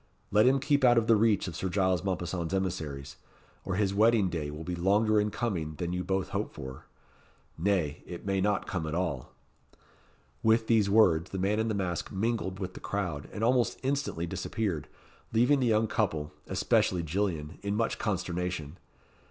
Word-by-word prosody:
Let 105 +4 +5
him 135 +1 +5
keep 140 +1 +1
out 120 -1 +6
of 115 - +3
the 115 - +5
reach 105 -2 +2
of 85 - -6
Sir 95 +3 -2
Giles 95 -2 +1
Mompesson's 90 -2 -2
emissaries, 75 -7 -3 0.5
or 95 - -2
his 100 -1 +1
wedding 110 -1 +4
day 80 -4 -3
will 75 +2 -7
be 90 - -4
longer 105 +5 +3
in 105 - 0
coming 90 -9 -2
than 85 +1 -3
you 90 0 -2
both 95 +1 -1
hope - - -2
for. 65 0 -8 0.7
Nay, 85 -5 0
it 85 +1 -8
may 95 -1 0
not 100 0 +1
come 85 -5 -3
at 80 - -3
all." 85 -8 -2 1.1
With 110 0 +3
these 110 -3 +3
words, 95 -5 +4
the 95 - -5
man 100 +3 +1
in 110 - +1
the 110 - -1
mask 90 -3 -2
mingled 100 -2 -1
with 95 -2 -5
the - - -9
crowd, 90 -8 -3
and 110 - -4
almost 120 0 +2
instantly 135 - -1
disappeared, 90 -3 -3 0.5
leaving 125 +5 +4
the 125 - +2
young 110 0 +3
couple, 85 -9 -1
especially 90 -2 +1
Gillian, 80 -2 -2
in 100 0 -2
much 115 +1 0
consternation. 90 -5 -3
95 Hz, 180 wpm, -29 LUFS, 85-110 Hz, 1.1 s, out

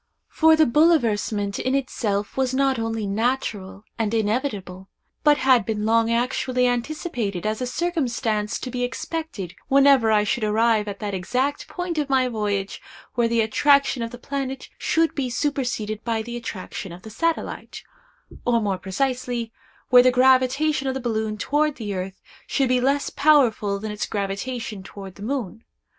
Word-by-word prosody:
For 320 0 +5
the 315 0 +5
bouleversement 230 -9 +2
in 260 +1 0
itself 210 -6 -2
was 260 -1 0
not 270 -2 +2
only 225 -1 -2
natural 205 -2 -2 0.2
and 225 0 0
inevitable, 205 -5 -2 0.3
but 295 -1 +5
had 260 -3 +4
been 210 -1 -2
long 230 +1 +3
actually 250 +1 +1
anticipated 245 - -2
as 215 +2 -1
a 250 - -1
circumstance 245 - -1
to 255 - -5
be 250 0 -2
expected 245 - -4
whenever 275 -4 +5
I 210 -1 +4
should 230 +2 -1
arrive 215 0 +2
at 200 -1 -5
that 205 -1 -3
exact 250 +10 -1
point 355 -3 -3
of 290 -2 -2
my 260 -1 +3
voyage 205 -4 -2 0.3
where 240 -2 +2
the 230 0 +2
attraction 280 +4 +3
of 230 - -2
the 245 - -9
planet 270 0 -5
should 325 0 +1
be 265 -3 -2
superseded 240 -5 -2
by 225 -2 -1
the 240 +1 -6
attraction 195 -5 -6
of 175 +2 -11
the 220 - -9
satellite—or, 330 - -3
more 200 -4 -1
precisely, 245 +2 -2 0.4
where 250 0 +8
the 255 - +5
gravitation 260 +3 +3
of 265 - -1
the - - -2
balloon 220 -3 -2
toward 295 +6 +1
the 210 -4 -5
earth 190 0 -5 0.3
should 270 -3 +1
be 250 0 +2
less 275 +2 +1
powerful 245 -9 +3
than 215 +1 -5
its 210 - -3
gravitation 210 +2 -4
toward 195 0 -10
the 200 - -15
moon. 225 -2 -4
240 Hz, 160 wpm, -23 LUFS, 210-270 Hz, 0.4 s, where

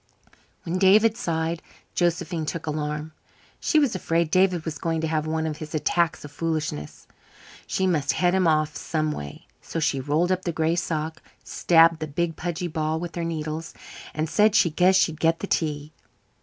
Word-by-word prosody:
When 180 +2 -2
David 210 +4 +5
sighed 165 -5 -2 0.3
Josephine 170 -2 -1
took 165 - -4
alarm. 150 0 -3 0.5
She 310 - +1
was 285 -5 +3
afraid 165 -3 0
David 185 -3 +3
was 160 -3 -4
going 165 -1 -1
to 160 - -1
have 155 -1 -1
one 160 0 -1
of 155 -1 -3
his 155 0 -7
attacks 160 +1 0
of 145 - -10
foolishness. 155 - -3 0.6
She 190 - 0
must 155 -6 +1
head 180 0 +2
him 190 -2 +3
off 155 -1 +2
someway, 155 - -3 0.2
so 165 - -4
she 150 -3 +1
rolled 150 +7 +1
up 185 0 +1
the 175 - -2
gray 160 +1 +1
sock, 160 -2 -3 0.2
stabbed 165 -1 +4
the 155 - -3
big 165 +2 -2
pudgy 175 +1 -3
ball 155 -1 -1
with 175 0 -5
her 170 - -3
needles, 160 -1 -4 0.4
and 155 +1 -1
said 210 +5 +3
she 170 - +4
guessed 185 +4 +4
she'd 160 -2 0
get 165 0 +3
the 185 - -4
tea. 150 -4 -2
160 Hz, 180 wpm, -25 LUFS, 155-175 Hz, 0.6 s, David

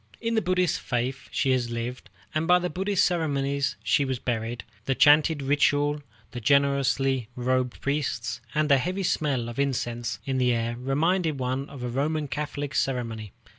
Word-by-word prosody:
In 230 0 -1
the 220 - +2
Buddhist 180 -2 +1
faith 130 +1 -2
she 135 - +1
had 125 -2 +1
lived, 115 -1 -5 0.2
and 155 +1 0
by 180 0 +6
the 180 0 -2
Buddhist 195 +1 +1
ceremonial 140 -5 0 0.2
she 145 - +3
was 130 -2 -1
buried, 115 -2 -3 0.2
the 135 - +1
chanted 150 +1 +5
ritual, 145 +1 +2 0.3
the 120 - -6
gorgeously 135 -1 +2
robed 125 0 0
priests, 120 -6 -2
and 155 0 +2
the 140 -2 +5
heavy 185 +7 -2
smell 140 -8 0
of 120 +2 -6
incense 120 -5 -1
in 135 -1 -1
the 125 -1 +3
air 115 0 -1
reminding 155 +6 0
one 130 +2 -2
of 135 -3 -8
a - - -2
Roman 150 +4 -1
Catholic 145 -1 -4
ceremony. 115 -7 -2
135 Hz, 170 wpm, -26 LUFS, 125-150 Hz, 0.3 s, by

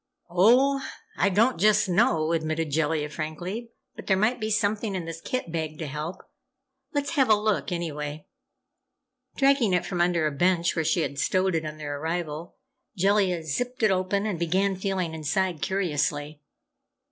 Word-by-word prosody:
"Oh, 255 +10 +4 0.3
I 200 - +2
don't 225 +5 +2
just 210 +1 +4
know," 175 -5 +2
admitted 160 -1 -1
Jellia, 150 0 0
frankly. 175 +10 -5 0.3
"But - - -10
there 190 - +3
might 220 +6 +1
be 215 - -1
something 210 -1 0
in 180 -3 -3
this 165 0 -7
kit 255 -7 -3
bag 160 -2 -3
to 160 - -4
help! 150 +6 -5 0.7
Let's 285 0 -1
have 270 -7 +2
a 215 - +7
look, 210 -2 -1
anyway." 150 -3 -4 1.1
Dragging 270 -7 +3
it 180 - 0
from 175 -2 -2
under 175 -2 +2
a 155 - +1
bench 175 +3 +1
where 160 - 0
she 165 +2 +1
had 140 -2 -3
stowed 185 0 +1
it 160 -1 -1
on 155 0 -7
their 145 -2 -5
arrival, 165 0 -4 0.4
Jellia 190 -2 +2
zipped 245 - -3
it 215 - +5
open 190 +2 0
and 200 -6 -2
began 190 +4 +1
feeling 185 -3 -2
inside, 170 +2 -1
curiously. 150 -4 -1
175 Hz, 165 wpm, -26 LUFS, 155-205 Hz, 1.1 s, a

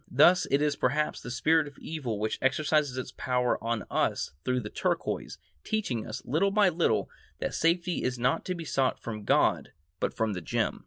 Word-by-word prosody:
Thus 170 +7 +5
it 140 +2 +3
is 150 -1 +1
perhaps 145 +4 0
the - - -7
spirit 155 +5 +2
of 145 - -12
evil 135 -9 -4
which 110 +1 -2
exercises 145 0 +1
its 130 0 -4
power 125 -3 0
on 115 -1 -1
us - - 0
through 125 0 0
the 105 - -7
turquoise, - - -2 0.3
teaching 165 - -2
us, - - -6
little 160 +10 +2
by 200 -1 +4
little, 165 -10 +1 0.3
that - - -3
safety 175 +2 +1
is 125 0 -1
not 125 +2 +1
to 185 - -2
be 170 -1 -6
sought 135 -3 +1
from 105 -3 -6
God - - +2 0.3
but - - 0
from 110 -3 -1
a 90 - -4
gem. 80 - -1
135 Hz, 195 wpm, -29 LUFS, 120-160 Hz, 0.3 s, Thus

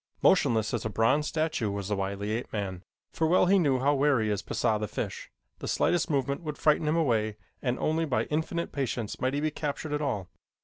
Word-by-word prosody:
Motionless 120 - +3
as - - -1
a 110 - -2
bronze 130 +8 +2
statue 155 -9 -1
was 100 -1 -4
the 105 - +1
wily 100 +1 -3
ape 115 +3 -3
man, 95 -4 -4 0.3
for 160 - +1
well 180 +3 +4
he 195 +2 +5
knew 140 -6 +3
how 140 +3 +2
wary 135 -6 +2
is 100 -1 -1
Pisah, 105 +1 0
the 105 - -2
fish. - - -5 0.3
The - - -5
slightest 175 0 +1
movement 140 0 0
would 150 -3 -5
frighten 155 0 +3
him 155 - +2
away 110 -9 +1 0.2
and 125 -1 0
only 160 +1 0
by 135 -5 +1
infinite 160 +2 -2
patience 125 -5 -3
might 130 +2 +1
he 145 - 0
be 155 0 0
captured 150 0 -4
at 150 - -1
all. 105 -11 -2
135 Hz, 215 wpm, -28 LUFS, 110-155 Hz, 0.3 s, he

